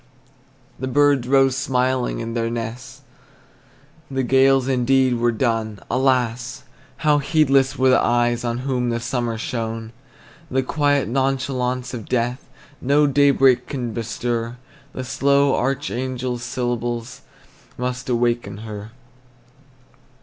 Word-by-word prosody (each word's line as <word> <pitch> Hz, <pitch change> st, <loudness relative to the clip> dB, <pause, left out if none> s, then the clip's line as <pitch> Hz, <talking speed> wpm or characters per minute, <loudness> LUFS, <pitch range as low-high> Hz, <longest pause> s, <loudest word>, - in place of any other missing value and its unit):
The 130 Hz, -, -3 dB
birds 140 Hz, -2 st, +3 dB
rose 135 Hz, -1 st, +4 dB
smiling 130 Hz, -2 st, 0 dB
in 115 Hz, 0 st, -5 dB
their 115 Hz, -1 st, -1 dB
nests, 115 Hz, +1 st, -6 dB, 1.1 s
The 135 Hz, -1 st, -1 dB
gales 135 Hz, +1 st, +4 dB
indeed 130 Hz, -1 st, +2 dB
were 120 Hz, 0 st, +2 dB
done; 110 Hz, -3 st, -1 dB
Alas! 125 Hz, 0 st, 0 dB, 0.4 s
how 150 Hz, -1 st, +4 dB
heedless 140 Hz, -3 st, +2 dB
were 130 Hz, 0 st, +4 dB
the -, -, +4 dB
eyes 120 Hz, 0 st, +1 dB
On 120 Hz, -1 st, -1 dB
whom 125 Hz, -3 st, 0 dB
the 115 Hz, 0 st, -1 dB
summer 120 Hz, -1 st, -2 dB
shone! 115 Hz, -1 st, -4 dB, 0.6 s
The 130 Hz, 0 st, 0 dB
quiet 145 Hz, 0 st, +1 dB
nonchalance 130 Hz, 0 st, -1 dB
of 115 Hz, -4 st, -7 dB
death 125 Hz, +2 st, -1 dB, 0.3 s
No 145 Hz, +3 st, +3 dB
daybreak 135 Hz, -3 st, +4 dB
can 125 Hz, -5 st, -4 dB
bestir; 115 Hz, +1 st, -3 dB, 0.4 s
The 130 Hz, -, -5 dB
slow 140 Hz, +2 st, +2 dB
archangel's 130 Hz, -2 st, -2 dB
syllables 120 Hz, +1 st, -3 dB, 0.6 s
Must 125 Hz, +1 st, -4 dB
awaken 120 Hz, -3 st, 0 dB
her. 105 Hz, 0 st, -8 dB
125 Hz, 115 wpm, -21 LUFS, 120-135 Hz, 1.1 s, rose